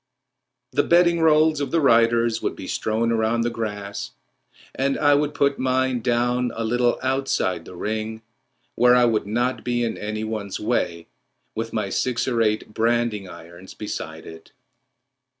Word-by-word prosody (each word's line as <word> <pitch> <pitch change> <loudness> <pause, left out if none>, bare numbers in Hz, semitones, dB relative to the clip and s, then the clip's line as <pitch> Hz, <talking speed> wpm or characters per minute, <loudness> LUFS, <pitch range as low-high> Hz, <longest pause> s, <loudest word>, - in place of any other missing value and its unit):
The - - +2
bedding 170 0 +4
rolls 155 -1 +4
of 140 - -2
the 165 - +1
riders 115 -3 +3
would - - -2
be - - -8
strewn 115 +2 -1
round 115 +1 +1
the 120 - -1
grass, 105 -3 -5 0.6
and 135 +1 0
I 145 -1 +4
would 145 +1 +1
put 140 0 +1
mine 130 -1 +1
down 120 +1 +1
a 115 - -3
little 120 +2 +1
outside 130 -10 -1
the - - -11
ring, 110 +3 -4 0.5
where 125 0 +5
I 125 -1 +5
would 110 -3 0
not 120 +4 -1
be 120 -1 0
in 115 - -3
any 110 +1 -4
one's 110 -3 -4
way, 85 -7 -1 0.5
with - - -4
my - - -2
six 125 -1 -1
or 120 -3 +1
eight 105 -1 0
branding 115 -4 0
irons 85 +2 -12
beside 80 -6 -6
it. 80 0 -12
115 Hz, 160 wpm, -23 LUFS, 110-130 Hz, 0.6 s, where